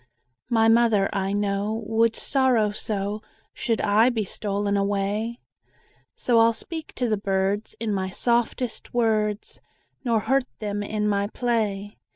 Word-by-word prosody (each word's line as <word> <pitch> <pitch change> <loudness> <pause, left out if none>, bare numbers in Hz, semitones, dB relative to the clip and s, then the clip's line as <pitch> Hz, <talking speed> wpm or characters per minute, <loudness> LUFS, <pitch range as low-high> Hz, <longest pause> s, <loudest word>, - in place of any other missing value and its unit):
My 225 -2 +4
mother, 225 -3 +4
I 195 0 -1
know, 205 +2 -1
Would 225 +1 +2
sorrow 255 -6 +2
so, 205 0 -3 0.3
Should 230 -1 -1
I 215 +4 +4
be 225 -4 -1
stolen 200 +1 -2
away; 205 +4 -1 0.8
So 235 -2 +2
I'll 230 0 +5
speak 320 +6 -7
to 250 - 0
the 215 -2 +1
birds 195 +1 -1
In 220 -2 -1
my 190 -1 -1
softest 235 +3 -1
words, 215 -3 0 0.4
Nor 230 -4 +1
hurt 265 +4 +1
them 205 -1 -3
in 210 0 -1
my 200 -1 +1
play. 210 -4 -2
215 Hz, 140 wpm, -25 LUFS, 200-230 Hz, 0.8 s, I'll